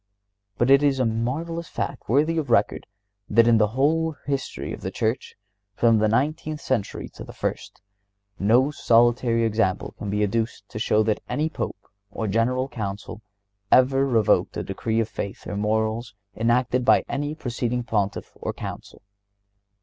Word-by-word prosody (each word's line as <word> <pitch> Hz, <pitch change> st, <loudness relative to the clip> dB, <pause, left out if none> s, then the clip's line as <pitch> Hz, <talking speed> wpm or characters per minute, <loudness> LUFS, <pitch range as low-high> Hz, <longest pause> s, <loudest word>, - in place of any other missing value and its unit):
But 120 Hz, +3 st, +2 dB
it 140 Hz, +1 st, +7 dB
is 140 Hz, -2 st, +2 dB
a 130 Hz, -, +2 dB
marvelous 145 Hz, +10 st, -2 dB
fact -, -, -5 dB
worthy 155 Hz, +6 st, +2 dB
of 145 Hz, -5 st, -4 dB
record 115 Hz, -3 st, +2 dB, 0.4 s
that 115 Hz, +2 st, +5 dB
in 115 Hz, -2 st, +5 dB
the 105 Hz, -, +4 dB
whole 160 Hz, +3 st, +2 dB
history 140 Hz, -1 st, -3 dB
of -, -, -8 dB
the -, -, -3 dB
Church, 110 Hz, +3 st, -2 dB, 0.4 s
from 115 Hz, -1 st, +4 dB
the 110 Hz, -, +3 dB
nineteenth 150 Hz, +6 st, 0 dB
century 125 Hz, -8 st, -2 dB
to -, -, -10 dB
the -, -, -11 dB
first, -, -, -5 dB, 0.6 s
no 120 Hz, +8 st, +4 dB
solitary 120 Hz, -2 st, +3 dB
example 110 Hz, -4 st, 0 dB
can 105 Hz, -, -4 dB
be 105 Hz, +1 st, 0 dB
adduced 105 Hz, -1 st, -2 dB
to 110 Hz, -, -6 dB
show 110 Hz, 0 st, +2 dB
that 110 Hz, 0 st, 0 dB
any 150 Hz, +6 st, 0 dB
Pope -, -, -5 dB, 0.2 s
or 110 Hz, +2 st, -4 dB
General 120 Hz, +5 st, +1 dB
Council 105 Hz, -3 st, -6 dB, 0.5 s
ever 135 Hz, +1 st, +5 dB
revoked 115 Hz, -5 st, +2 dB
a -, -, -2 dB
decree 110 Hz, +3 st, -2 dB
of 115 Hz, -, +1 dB
faith 100 Hz, -3 st, -6 dB
or -, -, -5 dB
morals 110 Hz, +2 st, -1 dB, 0.2 s
enacted 125 Hz, +2 st, +1 dB
by 125 Hz, -, +4 dB
any 145 Hz, +2 st, -3 dB
preceding 125 Hz, -3 st, -2 dB
Pontiff 105 Hz, -4 st, -2 dB
or -, -, -5 dB
Council. -, -, -8 dB
115 Hz, 160 wpm, -24 LUFS, 110-135 Hz, 0.6 s, it